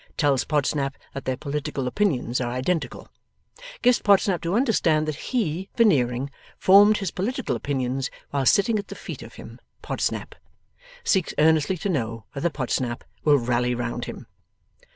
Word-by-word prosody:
Tells 140 Hz, -4 st, +2 dB
Podsnap 140 Hz, -2 st, 0 dB, 0.2 s
that 135 Hz, -, -6 dB
their 130 Hz, -1 st, -1 dB
political 145 Hz, -1 st, -3 dB
opinions 125 Hz, -, 0 dB
are 120 Hz, -1 st, -2 dB
identical. 145 Hz, +7 st, -2 dB, 0.8 s
Gives 245 Hz, 0 st, +5 dB
Podsnap 195 Hz, -3 st, +3 dB
to 170 Hz, +3 st, -1 dB
understand 170 Hz, -, +2 dB
that 155 Hz, -, -1 dB, 0.2 s
he, 190 Hz, -, -1 dB
Veneering, 140 Hz, -, +2 dB, 0.3 s
formed 205 Hz, +3 st, +6 dB
his 195 Hz, -5 st, -3 dB
political 245 Hz, +7 st, -2 dB
opinions 130 Hz, -1 st, -2 dB, 0.2 s
while 140 Hz, -3 st, 0 dB
sitting 210 Hz, +2 st, +4 dB
at 200 Hz, -, -6 dB
the -, -, -8 dB
feet -, -, -8 dB
of -, -, -11 dB
him, -, -, -11 dB, 0.2 s
Podsnap. -, -, -2 dB, 0.7 s
Seeks 190 Hz, -, +1 dB
earnestly 160 Hz, +3 st, +3 dB
to 200 Hz, -, -3 dB
know 115 Hz, -, -2 dB
whether 140 Hz, +5 st, -1 dB
Podsnap 130 Hz, -4 st, -2 dB, 0.2 s
'will 145 Hz, -2 st, +5 dB
rally 125 Hz, 0 st, 0 dB
round 120 Hz, 0 st, -3 dB
him? -, -, -8 dB
150 Hz, 150 wpm, -24 LUFS, 130-190 Hz, 0.8 s, formed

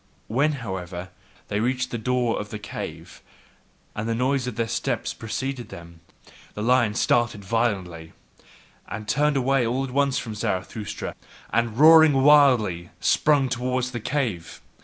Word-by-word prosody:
When, 140 Hz, +7 st, +1 dB
however, 90 Hz, -2 st, -6 dB, 0.4 s
they 100 Hz, -, -2 dB
reached 125 Hz, +2 st, -1 dB
the 120 Hz, -, -3 dB
door 125 Hz, 0 st, 0 dB
of 105 Hz, -, -6 dB
the 105 Hz, -, -5 dB
cave 105 Hz, -, -8 dB, 0.7 s
and 110 Hz, +2 st, -4 dB
the 115 Hz, -, 0 dB
noise 130 Hz, +1 st, 0 dB
of 125 Hz, -, -4 dB
their 115 Hz, 0 st, -1 dB
steps 115 Hz, -, -2 dB
had -, -, -13 dB
preceded 120 Hz, +1 st, -4 dB
them, 85 Hz, 0 st, -11 dB, 0.6 s
the 105 Hz, -, -4 dB
lion 120 Hz, -3 st, +3 dB
started 115 Hz, -4 st, +1 dB
violently; 95 Hz, -7 st, -2 dB, 0.8 s
it 110 Hz, 0 st, -6 dB
turned 150 Hz, +2 st, +2 dB
away 135 Hz, -2 st, +2 dB
all 130 Hz, +3 st, -1 dB
at 135 Hz, -, -5 dB
once 140 Hz, 0 st, +1 dB
from 110 Hz, -, -4 dB
Zarathustra, 105 Hz, 0 st, -4 dB, 0.4 s
and 115 Hz, 0 st, 0 dB
roaring 155 Hz, -2 st, +7 dB
wildly, 125 Hz, -12 st, +4 dB
sprang 145 Hz, -3 st, +3 dB
towards 125 Hz, 0 st, -2 dB
the 120 Hz, -, -4 dB
cave. 115 Hz, -, -3 dB
120 Hz, 150 wpm, -24 LUFS, 105-130 Hz, 0.8 s, roaring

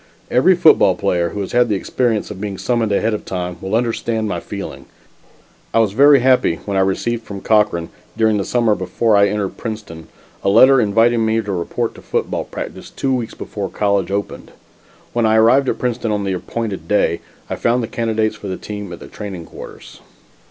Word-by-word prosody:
Every 180 Hz, +10 st, +5 dB
football 155 Hz, -, +5 dB
player 85 Hz, -2 st, 0 dB
who 100 Hz, -, -5 dB
has 95 Hz, -, -5 dB
had 120 Hz, -1 st, +3 dB
the 105 Hz, -, +1 dB
experience 110 Hz, +2 st, -1 dB
of 100 Hz, -2 st, -8 dB
being 100 Hz, -2 st, -4 dB
summoned 115 Hz, -2 st, 0 dB
ahead 110 Hz, +2 st, +1 dB
of 105 Hz, -, -3 dB
time 90 Hz, -1 st, -4 dB
will 95 Hz, +3 st, -2 dB
understand 115 Hz, -1 st, -1 dB
my 105 Hz, -, -2 dB
feeling. 80 Hz, -10 st, -8 dB, 0.9 s
I -, -, +5 dB
was 110 Hz, -3 st, +3 dB
very 140 Hz, +4 st, +6 dB
happy 130 Hz, -9 st, +3 dB
when 100 Hz, -, -3 dB
I -, -, +3 dB
received 105 Hz, +5 st, 0 dB
from 100 Hz, -3 st, -8 dB
Cochran, 105 Hz, -6 st, +2 dB, 0.3 s
during 110 Hz, -1 st, +3 dB
the 100 Hz, -, -1 dB
summer 115 Hz, 0 st, +2 dB
before 105 Hz, +4 st, 0 dB
I 100 Hz, 0 st, +5 dB
entered 100 Hz, -1 st, -3 dB
Princeton, 105 Hz, -8 st, -7 dB, 0.4 s
a 100 Hz, -, +2 dB
letter 130 Hz, +5 st, +6 dB
inviting 115 Hz, +3 st, +3 dB
me 110 Hz, 0 st, +1 dB
to 105 Hz, -2 st, -5 dB
report 100 Hz, +6 st, -2 dB
for -, -, -14 dB
football -, -, -2 dB
practice -, -, -7 dB
two 135 Hz, -1 st, -2 dB
weeks 120 Hz, -3 st, -3 dB
before 100 Hz, -2 st, -5 dB
college 100 Hz, -2 st, 0 dB
opened. 100 Hz, +1 st, -4 dB, 0.6 s
When 120 Hz, -2 st, +2 dB
I 110 Hz, -, +3 dB
arrived 125 Hz, +5 st, +4 dB
at -, -, -1 dB
Princeton 120 Hz, -2 st, -2 dB
on 105 Hz, -1 st, -1 dB
the 95 Hz, -1 st, -1 dB
appointed 105 Hz, +2 st, -4 dB
day, 95 Hz, -5 st, +1 dB, 0.3 s
I -, -, -3 dB
found 120 Hz, +1 st, +1 dB
the -, -, -3 dB
candidates 110 Hz, -2 st, -1 dB
for 105 Hz, -, -9 dB
the 95 Hz, -, -4 dB
team 105 Hz, -3 st, -7 dB
at 85 Hz, -, -8 dB
the -, -, -10 dB
training 95 Hz, -5 st, -7 dB
quarters. -, -, -12 dB
105 Hz, 200 wpm, -18 LUFS, 100-115 Hz, 0.9 s, very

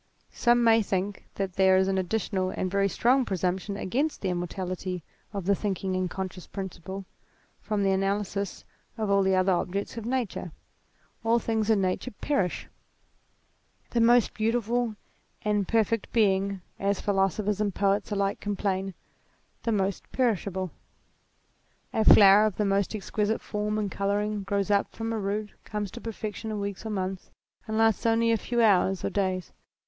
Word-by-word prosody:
Some 240 Hz, 0 st, +3 dB
may 225 Hz, -1 st, +6 dB
think 195 Hz, 0 st, -2 dB
that 195 Hz, -2 st, -2 dB
there 190 Hz, 0 st, +5 dB
is 190 Hz, 0 st, +3 dB
an 190 Hz, 0 st, +1 dB
additional 190 Hz, 0 st, -1 dB
and 185 Hz, 0 st, -3 dB
very 200 Hz, 0 st, +2 dB
strong 255 Hz, +6 st, +3 dB
presumption 190 Hz, 0 st, -2 dB
against 275 Hz, +11 st, -1 dB
the 195 Hz, -, -1 dB
immortality 180 Hz, 0 st, -3 dB, 0.3 s
of 200 Hz, -4 st, -4 dB
the 200 Hz, -, +4 dB
thinking 195 Hz, -1 st, -2 dB
and 185 Hz, -1 st, 0 dB
conscious 185 Hz, -1 st, -6 dB
principle, 190 Hz, 0 st, -6 dB, 0.6 s
from 210 Hz, -2 st, -1 dB
the 195 Hz, -, +3 dB
analysis 200 Hz, 0 st, -1 dB, 0.3 s
of 215 Hz, -2 st, -1 dB
all 200 Hz, 0 st, +4 dB
the 190 Hz, 0 st, +3 dB
other 185 Hz, +1 st, +3 dB
objects 190 Hz, +5 st, -2 dB
of 230 Hz, 0 st, -5 dB
Nature. 235 Hz, -9 st, -2 dB, 0.7 s
All 230 Hz, +1 st, +3 dB
things 225 Hz, -2 st, -1 dB
in 215 Hz, -3 st, +4 dB
202 -, -, +2 dB
THEISM 185 Hz, -, +2 dB
Nature 215 Hz, +3 st, -6 dB
perish, 195 Hz, -, -1 dB, 1.2 s
the 235 Hz, -, +2 dB
most 240 Hz, 0 st, +5 dB
beautiful 230 Hz, 0 st, 0 dB, 0.5 s
and 210 Hz, -2 st, +1 dB
perfect 225 Hz, -1 st, +1 dB
being, 195 Hz, -3 st, +2 dB, 0.2 s
as 200 Hz, 0 st, 0 dB
philosophers 200 Hz, +1 st, 0 dB
and 205 Hz, -3 st, -1 dB
poets 200 Hz, +1 st, +1 dB
alike 200 Hz, 0 st, 0 dB
complain, 195 Hz, -2 st, -2 dB, 0.7 s
the 230 Hz, -, -1 dB
most 195 Hz, -2 st, -1 dB
perishable. 195 Hz, -7 st, 0 dB, 1.2 s
A 220 Hz, -, +2 dB
flower 205 Hz, 0 st, +8 dB
of 210 Hz, -, -3 dB
the 210 Hz, -, 0 dB
most 200 Hz, +1 st, +1 dB
exquisite 210 Hz, +1 st, -1 dB
form 210 Hz, 0 st, -2 dB
and 205 Hz, -2 st, -1 dB
colouring 205 Hz, +1 st, -1 dB
grows 200 Hz, +1 st, -1 dB
up 200 Hz, -1 st, +2 dB
from 225 Hz, 0 st, -3 dB
a 225 Hz, -, -1 dB
root, 205 Hz, +1 st, -2 dB
comes 210 Hz, -2 st, -4 dB
to -, -, -9 dB
perfection 220 Hz, 0 st, -5 dB
in 215 Hz, -1 st, -3 dB
weeks 200 Hz, +2 st, -4 dB
or -, -, -3 dB
months, 190 Hz, -2 st, -3 dB, 0.4 s
and 220 Hz, 0 st, -2 dB
lasts 225 Hz, 0 st, +3 dB
only 230 Hz, 0 st, +3 dB
a 225 Hz, -, +3 dB
few 240 Hz, +2 st, 0 dB
hours 190 Hz, -3 st, +3 dB
or -, -, -1 dB
days. 185 Hz, -3 st, -1 dB
200 Hz, 165 wpm, -27 LUFS, 190-220 Hz, 1.2 s, flower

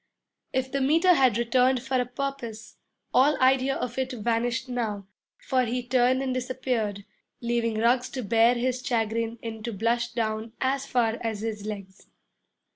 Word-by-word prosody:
If 260 Hz, 0 st, -1 dB
the 275 Hz, -, -1 dB
Meter 325 Hz, +7 st, +5 dB
had 260 Hz, -7 st, +3 dB
returned 250 Hz, +1 st, +2 dB
for 260 Hz, -1 st, +1 dB
a 245 Hz, -, -3 dB
purpose, 245 Hz, -4 st, -5 dB, 0.4 s
all 285 Hz, +4 st, +4 dB
idea 260 Hz, +1 st, +3 dB
of 250 Hz, +1 st, -3 dB
it 260 Hz, 0 st, -1 dB
vanished 235 Hz, 0 st, -1 dB
now, 220 Hz, -5 st, -3 dB, 0.3 s
for 255 Hz, -1 st, 0 dB
he 245 Hz, +2 st, -2 dB
turned 255 Hz, +1 st, +3 dB
and 260 Hz, -1 st, -1 dB
disappeared, 250 Hz, -5 st, -2 dB, 0.3 s
leaving 235 Hz, -2 st, -1 dB
Ruggs 240 Hz, +3 st, +2 dB
to 255 Hz, -, -2 dB
bear 230 Hz, +3 st, +4 dB
his 250 Hz, +1 st, -1 dB
chagrin 230 Hz, -2 st, -1 dB
and 225 Hz, -1 st, -6 dB
to 235 Hz, -, -3 dB
blush 235 Hz, +3 st, 0 dB
down 220 Hz, -1 st, -2 dB
as 270 Hz, +1 st, 0 dB
far 230 Hz, -2 st, +1 dB
as 220 Hz, -2 st, -2 dB
his 215 Hz, -2 st, -4 dB
legs. 195 Hz, -3 st, -8 dB
240 Hz, 160 wpm, -26 LUFS, 225-260 Hz, 0.4 s, Meter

